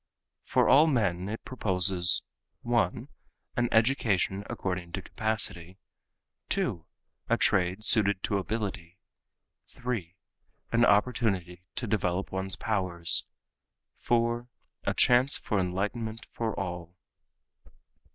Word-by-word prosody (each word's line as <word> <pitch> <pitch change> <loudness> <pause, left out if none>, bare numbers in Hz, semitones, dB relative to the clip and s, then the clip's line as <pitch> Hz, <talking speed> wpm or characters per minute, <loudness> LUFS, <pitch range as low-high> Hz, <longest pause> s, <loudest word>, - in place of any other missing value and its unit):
For - - +2
all 150 +4 +6
men 100 - 0
it 110 - -7
proposes 95 -6 +3 0.4
(1) - - -1 0.5
an 120 -1 0
education 110 -5 +1
according 90 -2 -4
to 95 - -3
capacity; 100 -5 -1 0.7
(2) 85 - -1 0.5
a - - +2
trade 95 +2 +1
suited 100 -4 +5
to 100 - 0
ability; 95 -4 -5 0.7
(3) 110 -9 -5 0.6
an 120 +1 +3
opportunity 100 -5 0
to 125 - -3
develop 95 -3 -2
one's 95 0 -2
powers; 95 -6 +2 0.7
(4) 120 0 0 0.4
a - - -1
chance 125 +3 +3
for 105 - -2
enlightenment 105 +5 -3
for 115 -2 -4
all. 90 -2 -6
100 Hz, 105 wpm, -28 LUFS, 90-115 Hz, 0.7 s, all